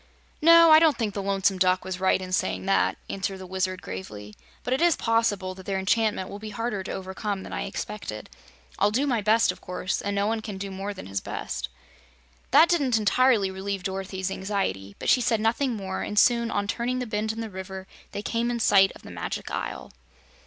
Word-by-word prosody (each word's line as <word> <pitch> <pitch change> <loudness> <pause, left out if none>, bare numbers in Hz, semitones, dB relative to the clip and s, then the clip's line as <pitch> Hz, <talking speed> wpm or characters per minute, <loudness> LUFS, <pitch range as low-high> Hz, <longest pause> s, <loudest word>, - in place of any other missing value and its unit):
"No, 335 +1 +8
I 310 - +10
don't 320 -2 +4
think 220 -4 -1
the 200 - -3
Lonesome 195 -1 +1
Duck 185 0 +2
was 190 -1 -4
right 190 0 +3
in 185 -1 -7
saying 185 - -1
that," 195 - +2
answered 195 0 -3
the 190 - -9
Wizard, 185 0 -2
gravely, 105 +3 -7 0.3
"but 250 - -1
it 265 - 0
is 345 -2 +5
possible 215 -5 0
that 190 0 -13
their 195 -1 -1
enchantment 205 0 +1
will 200 - -8
be 215 0 -7
harder 225 -1 -3
to - - -6
overcome 190 +1 -4
than - - -8
I - - -2
expected. - - -6 0.5
I'll 205 - +4
do 250 +7 +1
my 245 -6 +1
best, 220 0 +4
of - - -13
course, 180 +1 -3
and 200 0 -2
no 200 0 +1
one 220 +1 0
can 210 -3 -6
do 195 0 -5
more 195 +2 -4
than - - -9
his 100 0 -3
best." 65 0 -5 0.8
That 300 +6 +7
didn't 280 -10 +2
entirely 220 -1 +3
relieve 195 0 -4
Dorothy's 190 0 -3
anxiety, 190 - -3
but - - -6
she 255 - +5
said 225 -1 +1
nothing 235 +3 +1
more, 190 -2 -4
and 210 - -4
soon, 235 +1 +4
on 205 -2 -1
turning 245 +4 -1
the 250 - -2
bend 215 -1 -1
in 225 - -7
the 225 -2 -5
river, 190 0 -7 0.3
they 205 - -5
came 235 +2 -1
in 240 -1 -2
sight 195 -3 +5
of - - -15
the - - -10
Magic - - -5
Isle. - - -5
200 Hz, 215 wpm, -26 LUFS, 190-230 Hz, 0.8 s, I